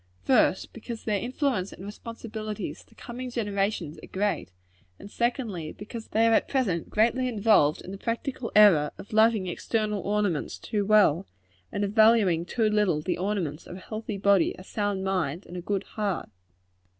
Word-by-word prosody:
First, 180 - +2
because 230 0 -7
their 210 -2 0
influence 250 -5 -1
and 190 - -10
responsibilities 215 -1 -6
to - - -24
coming 250 +1 -7
generations 200 -8 -2
are - - -9
great, 200 - -1 0.5
and, 205 - -12
secondly, 225 - -2
because 225 +2 -8
they 225 +1 +2
are 230 - +4
at - - +3
present 205 - 0
greatly 235 +4 +2
involved 210 -10 +3
in 185 - -8
the 195 - -7
practical 235 +2 -3
error 190 -9 +7
of 205 - -11
loving 220 -2 +4
external 210 +3 -1
ornaments 205 -6 -1
too 205 -3 -2
well, 195 -5 +4 0.4
and 205 - -2
of 200 - -1
valuing 215 -7 +4
too 225 +4 0
little 210 -7 +2
the 175 +3 -2
ornaments 180 -6 -2
of - - -8
a - - -9
healthy 215 +1 -5
body, 200 -2 +3
a 185 - -10
sound 205 -1 -2
mind, 185 -3 -1
and 180 - -10
a 180 - -4
good 195 +2 -2
heart. 205 -5 -3
205 Hz, 170 wpm, -27 LUFS, 185-225 Hz, 0.5 s, error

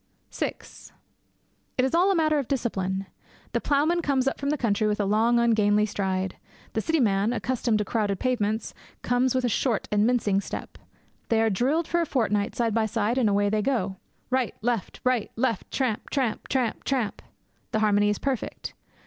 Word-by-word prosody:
VI - - -2 1.2
It 255 - +3
is 265 - -2
all 355 +4 +4
a - - +2
matter 310 -2 +2
of 270 - -3
discipline. 195 -7 -1 0.5
The - - -1
ploughman 305 +5 +2
comes 270 -4 +1
up 270 - -1
from 280 - -1
the 300 - +1
country 215 -4 +1
with 210 0 0
a 205 - +1
long 220 +4 +3
ungainly 210 -3 +3
stride. 190 -2 -2 0.4
The 220 - 0
city 325 +6 +1
man, 205 -2 +2
accustomed 245 -2 0
to 210 - -1
crowded 205 -2 -1
pavements, 220 -4 -1 0.3
comes 245 +1 +2
with 255 -1 +1
a - - +3
short 235 -1 0
and 210 +1 +3
mincing 210 -5 +2
step. - - -7 0.5
They 225 - +3
are 225 0 +3
drilled 280 - +1
for 345 - +1
a 335 - -1
fortnight 210 -7 0
side 230 -2 0
by 220 0 +2
side, 225 +3 0
and 230 -4 +3
away 205 0 +2
they 215 0 +1
go. 205 -6 -1 0.3
Right! 255 -3 0
Left! 235 -4 -1
Right! 255 -4 +1
Left! 230 -4 -1
Tramp! 250 -6 -1
tramp! 255 -6 -1
tramp! 250 -4 -1
tramp! 255 -6 -1 0.5
The 220 - 0
harmony 205 -1 +3
is 210 - 0
perfect. 270 -4 -3
230 Hz, 185 wpm, -26 LUFS, 210-260 Hz, 1.2 s, all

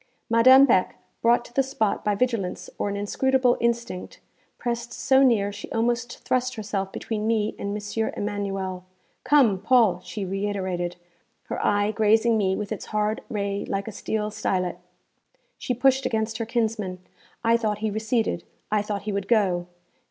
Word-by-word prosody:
Madame 260 +4 +8
Beck, 190 -8 +2 0.3
brought 240 +1 +3
to - - -15
the 275 - +3
spot 260 -6 -1
by 210 -1 +1
vigilance 225 -5 -2
or - - 0
an 200 - -3
inscrutable 250 +5 +2
instinct, 235 -5 -2 0.4
pressed 235 0 -3
so 265 +2 +3
near 220 -6 +3
she 205 0 -9
almost 240 +1 -1
thrust 255 0 0
herself 200 -3 -3
between 215 +1 -3
me 220 -2 +1
and 200 +1 -3
M. 210 +2 -2
Emanuel. 195 -3 -3 0.4
'Come, 250 -10 +4
Paul!' 215 -4 +4
she 190 +3 -5
reiterated, 190 -2 -2 0.5
her - - -3
eye 205 +1 +2
grazing 220 +1 +3
me 190 -3 +1
with 210 0 -5
its - - -4
hard 215 0 -1
ray 200 -1 -2
like 195 +1 -2
a - - -4
steel 215 +1 -3
stylet. 185 -3 -1 0.8
She 250 - -2
pushed 265 +2 +3
against 220 0 -2
her 230 - -3
kinsman. 220 -5 -1 0.5
I 230 0 +4
thought 215 -3 0
he 215 0 -2
receded; 220 -4 -1 0.3
I 210 -1 +3
thought 205 -1 -4
he 215 - -3
would 200 -1 -3
go. 185 -6 +2
215 Hz, 160 wpm, -25 LUFS, 200-235 Hz, 0.8 s, Madame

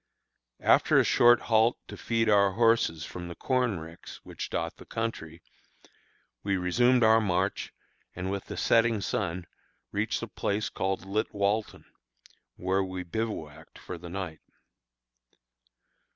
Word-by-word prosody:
After - - +4
a - - +6
short 120 0 +5
halt 115 +1 +3
to - - -8
feed 115 -1 0
our 100 -2 +4
horses 115 -8 +2
from 90 +1 -7
the 85 - -8
corn 125 -6 0
ricks 80 +1 -11
which - - -7
dot - - -3
the - - -13
country, 85 -8 -5 1.0
we 100 -1 0
resumed 120 +7 +3
our 110 0 +6
march, 95 -1 -1 0.4
and 90 +1 -3
with 100 -1 -4
the - - -7
setting 115 -1 +3
sun 90 -2 -2 0.5
reached - - -1
a - - -4
place 105 +1 -2
called 95 0 -2
Litwalton, 105 +1 -1 0.7
where 95 +2 0
we 95 -1 -5
bivouacked 90 -6 -5
for 90 - -8
the 85 +1 -9
night. 90 -4 -6
100 Hz, 135 wpm, -28 LUFS, 90-115 Hz, 1.0 s, a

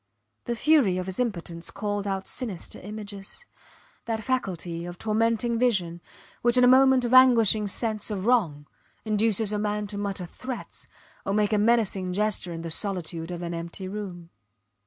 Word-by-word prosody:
The 235 - -2
fury 250 -9 +3
of 185 - -2
his 190 +3 -5
impotence 175 -8 -3
called 205 -1 -3
out 195 -1 -2
sinister 215 -10 -5
images, 205 - -8 0.6
that 220 -1 -2
faculty 180 -10 -2
of 175 0 -7
tormenting 230 +2 +1
vision, 185 -9 +1 0.4
which 240 +1 +3
in 250 - +6
a - - +7
moment 260 0 +6
of 240 - -1
anguishing 230 -5 +6
sense 215 +1 -1
of 200 -2 -3
wrong 175 -13 +2 0.4
induces 215 0 +1
a 210 - 0
man 210 0 -1
to 205 0 -5
mutter 200 -2 -3
threats 255 +8 -8 0.4
or 195 - -1
make 210 0 +2
a 210 - +3
menacing 205 -5 +2
gesture 210 -2 -1
in 165 -1 -5
the 165 - -3
solitude 170 -3 -3
of 175 0 -5
an 170 0 -4
empty 170 +3 -6
room. 185 -4 -7
205 Hz, 165 wpm, -26 LUFS, 180-230 Hz, 0.6 s, a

